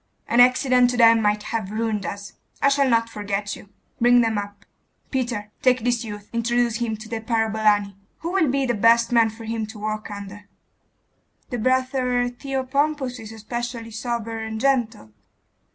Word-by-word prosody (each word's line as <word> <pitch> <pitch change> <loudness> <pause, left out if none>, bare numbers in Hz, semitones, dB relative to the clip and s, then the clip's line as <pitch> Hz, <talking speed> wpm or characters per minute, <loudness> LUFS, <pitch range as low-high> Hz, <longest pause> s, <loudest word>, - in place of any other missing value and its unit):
An 235 - +2
accident 250 0 +5
to 245 - -2
them 230 -1 +6
might 210 0 +1
have 220 -4 -3
ruined 215 -3 -2
us. 200 +1 -7 0.3
I 280 - +4
shall 280 -1 +2
not 230 -1 +2
forget 205 -2 -3
you. 200 - -14 0.3
Bring 245 +1 +5
them 225 -1 +1
up. 205 0 -6 0.5
Peter, 240 -6 -2
take 255 -2 +3
this 245 -1 +1
youth, 205 -2 -8
introduce 235 0 +1
him 230 -2 -2
to 215 +1 -10
the 225 0 -4
parabolani.... 215 -3 +1 0.3
Who 335 - -3
will 360 -6 +2
be 275 +1 +1
the 245 - 0
best 230 +2 +4
man 230 -2 +4
for 220 +1 -11
him 225 -1 -3
to 220 0 -10
work 215 +1 -4
under?' 205 0 -9 1.0
'The 245 - -2
brother 255 0 +1
Theopompus 270 0 -2
is 220 -1 -9
especially 230 +1 -5
sober 230 0 -4
and 220 0 -5
gentle. 235 - 0
230 Hz, 170 wpm, -23 LUFS, 215-245 Hz, 1.0 s, them